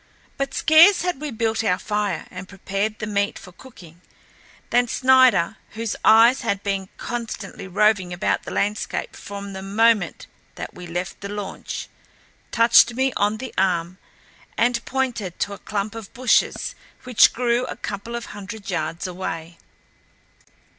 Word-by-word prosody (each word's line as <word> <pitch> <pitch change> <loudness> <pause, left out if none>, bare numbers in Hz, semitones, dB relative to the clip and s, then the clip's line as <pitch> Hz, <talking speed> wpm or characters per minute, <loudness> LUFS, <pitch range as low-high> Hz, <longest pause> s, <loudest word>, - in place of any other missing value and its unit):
But 275 0 -3
scarce 335 +5 +6
had 355 -6 -2
we 300 - -3
built 225 -2 -1
our 180 -4 +2
fire 205 -4 -2
and 185 0 -9
prepared 200 +2 -3
the 215 - -4
meat 200 -1 -1
for 180 - -12
cooking 175 -6 -15 0.7
than 245 0 +3
Snider, 255 -8 +4 0.2
whose 225 0 -3
eyes 230 +4 +6
had 200 -5 -2
been 195 -1 -2
constantly 225 -5 -6
roving 195 -1 +2
about 175 - 0
the - - -9
landscape 205 +1 -2
from 200 0 -8
the 190 - -6
moment 205 -1 +2 0.3
that - - -7
we 180 -1 -10
left 175 +2 -5
the 200 - -6
launch, 205 -1 -6 0.6
touched 235 0 +5
me 265 0 +1
on 205 +1 +1
the 255 +2 -7
arm 180 -1 0 0.6
and 235 0 +1
pointed 245 -9 -2
to 205 - -1
a - - -9
clump 205 0 -3
of 225 -3 -9
bushes 250 0 +1 0.3
which 250 -3 +5
grew 245 0 0
a - - -5
couple 205 +4 -6
of 235 - -5
hundred 205 0 -8
yards 165 0 -3
away. 170 -2 -6
210 Hz, 150 wpm, -22 LUFS, 190-235 Hz, 0.7 s, scarce